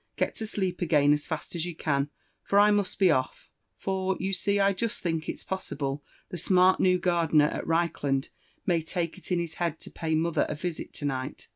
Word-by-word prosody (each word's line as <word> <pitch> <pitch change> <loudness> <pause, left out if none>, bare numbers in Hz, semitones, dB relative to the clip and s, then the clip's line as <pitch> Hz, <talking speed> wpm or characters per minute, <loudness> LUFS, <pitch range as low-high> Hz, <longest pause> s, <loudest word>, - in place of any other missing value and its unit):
Get - - 0
to 220 - -3
sleep, 190 -4 -2
again 150 -4 +4
as 150 0 -2
fast 160 -3 -5
as 170 0 -2
you 175 - -5
can, 140 -2 0 0.3
for 200 - +1
I 205 +1 +7
must 205 -2 0
be 190 -3 +5
off; 130 -3 -2 0.3
for, 190 0 -1
you 195 +1 -2
see, 200 +2 +1
I 200 0 +4
just 220 +4 -3
think 165 -2 -1
it's - - -5
possible* 145 -6 -3 0.3
the 180 - -5
smart 185 +2 +4
new 180 -1 +4
gardener 165 -4 +3
at - - -5
Reichland 145 -5 0 0.4
may 175 -4 +2
take 170 +2 -3
it 190 - -10
into 175 -1 +2
his 165 -1 -7
head 165 -2 0
to - - -9
pay 160 -1 -1
mother 165 +1 +1
a - - -2
visit 170 +1 -5
to 145 - -5
night." 130 0 -4
170 Hz, 215 wpm, -28 LUFS, 155-185 Hz, 0.4 s, I